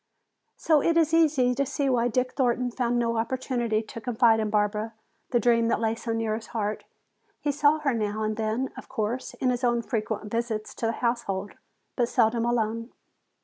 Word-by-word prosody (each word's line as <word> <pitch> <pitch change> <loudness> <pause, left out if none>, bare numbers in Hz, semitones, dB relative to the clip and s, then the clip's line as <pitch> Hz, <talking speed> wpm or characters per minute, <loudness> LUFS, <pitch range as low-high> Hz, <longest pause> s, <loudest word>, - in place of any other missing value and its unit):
So 310 -3 +3
it 335 +3 +2
is 325 -1 +3
easy 290 -7 +4
to 275 +3 +1
see 280 +1 -1
why 240 -2 +2
Dick 255 +2 0
Thornton 250 -2 +1
found 240 0 0
no 230 -1 0
opportunity 235 -2 -1
to 230 - -9
confide 230 0 +3
to 215 -1 0
Barbara 210 +1 0 0.3
the 240 - +2
dream 230 0 +3
that 230 - +1
lay 225 -1 +1
so 230 0 -5
near 225 -1 -1
his 220 +1 -5
heart. 210 0 -2 0.5
He 290 - 0
saw 290 +2 +3
her 295 -4 0
now 215 -1 -1
and 215 0 -1
then, 225 +4 -1
of - - -10
course, 245 0 -3
in 255 - +1
his 245 0 -3
own 240 -1 +2
frequent 215 -2 -3
visits 230 -2 -2
to 230 - -2
the - - +1
household, 205 -5 -1 0.4
but 240 -2 +1
seldom 230 +1 +2
alone. 230 0 -1
235 Hz, 190 wpm, -26 LUFS, 220-255 Hz, 0.5 s, easy